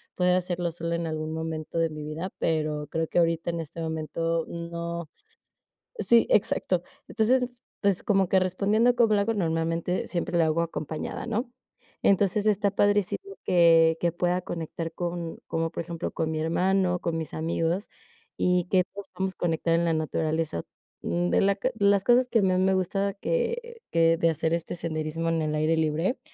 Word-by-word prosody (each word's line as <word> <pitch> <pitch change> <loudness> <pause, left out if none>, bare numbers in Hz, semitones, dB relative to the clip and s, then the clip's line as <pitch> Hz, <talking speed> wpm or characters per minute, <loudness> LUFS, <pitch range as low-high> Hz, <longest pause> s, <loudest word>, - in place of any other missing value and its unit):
poder 180 0 +3
hacerlo 175 -1 -1
sola 170 0 -3
en 170 0 -2
algún 155 0 -3
momento 160 0 -4
de 165 -1 +2
mi 155 -1 -6
vida, 160 +5 -5
pero 155 -2 -1
creo 160 +1 -2
que 175 - +1
ahorita 165 0 +1
en 170 - -4
este 165 +1 -7
momento 165 +1 -2
no 170 0 -5 0.9
Sí, 235 - +4
exacto. 185 -4 +2 0.2
Entonces, 250 +3 +2 0.4
pues, 200 -3 +1
como 195 -3 +2
que 190 - +4
respondiendo 205 +6 +2
a - - -7
cómo 230 -3 +3
le 200 - +3
hago, 225 +3 0
normalmente, 165 -1 -1
siempre 175 -1 -2
lo 165 - +4
hago 160 +1 +2
acompañada, 160 +1 -4
¿no?, 235 +1 -2 0.5
entonces 200 +1 +3
está 205 -1 +3
padrísimo 205 - +1 0.2
que 165 -2 +5
que 170 -1 +1
pueda 175 +1 0
conectar 165 -1 -5
con 170 -1 -4
como 165 0 -1
por - - -4
ejemplo, 170 -1 -5
con 160 -1 -2
mi 155 -1 -2
hermano, 180 +2 +1
con 170 -1 -2
mis 160 - -5
amigos, 165 +4 -1 0.5
y 180 -1 +2
que 185 -2 +4
todos 200 +2 -10
podamos 190 0 -1
conectar 165 -1 0
en 170 +1 +2
la 165 - +2
naturaleza, 155 - -1 0.4
mm, 85 +1 -1
de - - +3
la 195 0 +3
q 255 +6 -1
de 205 -2 -1
las 200 -1 +4
cosas 250 +1 +4
que 230 - +2
a - - +2
más 185 -1 +2
me 190 0 +3
gusta 195 +2 0
que 475 - -2
que 165 0 +4
de 165 0 +3
hacer, 160 +1 0
este 170 +1 -2
senderismo 160 0 -2
en 165 -1 +1
el 155 0 -1
aire 155 +2 +2
libre, 160 - 0
170 Hz, 185 wpm, -27 LUFS, 160-195 Hz, 0.9 s, que